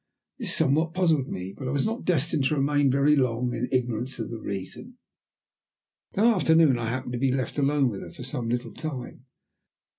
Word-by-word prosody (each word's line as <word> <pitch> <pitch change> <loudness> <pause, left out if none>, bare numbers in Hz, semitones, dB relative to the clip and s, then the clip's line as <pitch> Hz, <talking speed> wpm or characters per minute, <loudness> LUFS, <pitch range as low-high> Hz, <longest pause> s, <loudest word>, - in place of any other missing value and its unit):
This 210 -7 0
somewhat 160 +2 +2
puzzled 160 -7 +2
me, 95 -4 -5
but 135 - -6
I - - -1
was 140 -1 0
not 225 +2 -3
destined 155 -4 +1
to 150 - +2
remain 145 0 +2
very 140 +3 +4
long 125 -2 0
in 120 +2 -2
ignorance 125 0 -1
of - - -5
the 115 - -5
reason. 100 - -7 1.2
That 210 - +2
afternoon 160 - +4
I 115 -1 -2
happened 130 0 -4
to 120 - -2
be 135 0 +2
left 130 +1 -2
alone 140 -1 +3
with 105 -5 -4
her - - -8
for - - -10
some 125 -3 -4
little 120 +1 -2
time. 130 -4 -7
135 Hz, 190 wpm, -26 LUFS, 125-155 Hz, 1.2 s, very